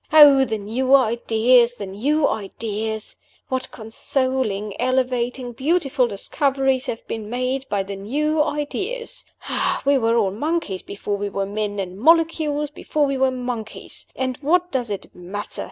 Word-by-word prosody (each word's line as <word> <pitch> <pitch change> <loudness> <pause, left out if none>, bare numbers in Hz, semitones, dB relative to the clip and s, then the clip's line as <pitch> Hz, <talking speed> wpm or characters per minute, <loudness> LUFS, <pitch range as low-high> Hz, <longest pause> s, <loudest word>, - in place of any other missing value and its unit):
Oh, 290 -3 +8
the 220 -3 -2
new 245 +6 +2
ideas! 235 0 +4
the 205 - -6
new 280 +11 +1
ideas! 220 +1 -3 0.3
what 260 0 -2
consoling, 225 -2 -1
elevating, 250 -1 0
beautiful 275 -1 +1
discoveries 270 +4 0
have 225 - -5
been 215 -2 -5
made 255 +2 -2
by 200 -1 0
the 200 +1 -6
new 300 +10 0
ideas! 455 +13 -3 0.6
We 280 -1 +4
were 230 0 +2
all 200 -4 +2
monkeys 290 - -2
before 200 0 -4
we 205 0 -3
were 195 0 -2
men, 205 0 -3
and 190 -1 -4
molecules 315 0 +3
before 300 0 0
we 275 -1 -1
were 265 0 +4
monkeys! 245 -4 -6
and 260 -1 -2
what 355 +5 +2
does 245 -4 -1
it 200 -2 -5
matter? 190 +4 -7
250 Hz, 145 wpm, -22 LUFS, 215-280 Hz, 0.6 s, Oh